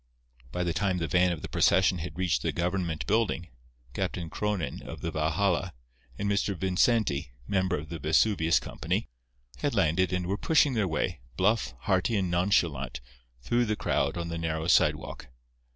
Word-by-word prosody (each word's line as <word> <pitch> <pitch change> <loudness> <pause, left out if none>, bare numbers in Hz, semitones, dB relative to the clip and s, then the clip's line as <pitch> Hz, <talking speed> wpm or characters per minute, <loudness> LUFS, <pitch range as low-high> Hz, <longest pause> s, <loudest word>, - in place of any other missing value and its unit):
By 90 - -1
the 85 -1 -1
time 95 -1 0
the 85 -2 -2
van 90 +1 +3
of 85 - -5
the - - -3
procession 90 0 +3
had 80 0 -6
reached 90 -3 +1
the - - 0
government 85 -2 -2
building, 105 -5 0 0.4
Captain 85 -3 -3
Cronin, 100 -10 -2
of - - -9
the 85 - -2
Valhalla, 85 +4 0 0.4
and 100 - -2
Mr. 100 0 0
Vincenti, 90 - +1
member 95 -2 +1
of 75 +1 -7
the 85 -1 -5
Vesuvius 80 +1 +3
Company, - - -3 0.5
had - - -1
landed 90 +4 +2
and 90 -1 -1
were 95 +3 -1
pushing 150 -3 +3
their 110 -5 +1
way, 80 0 -1 0.2
bluff, 105 +5 +1
hearty 95 +1 +1
and 95 -3 0
nonchalant, 80 -9 +1 0.4
through 120 - +2
the 110 -1 0
crowd - - 0
on 85 -1 -3
the 85 0 -4
narrow 80 -1 -2
sidewalk. 90 - +2
90 Hz, 170 wpm, -28 LUFS, 80-100 Hz, 0.5 s, van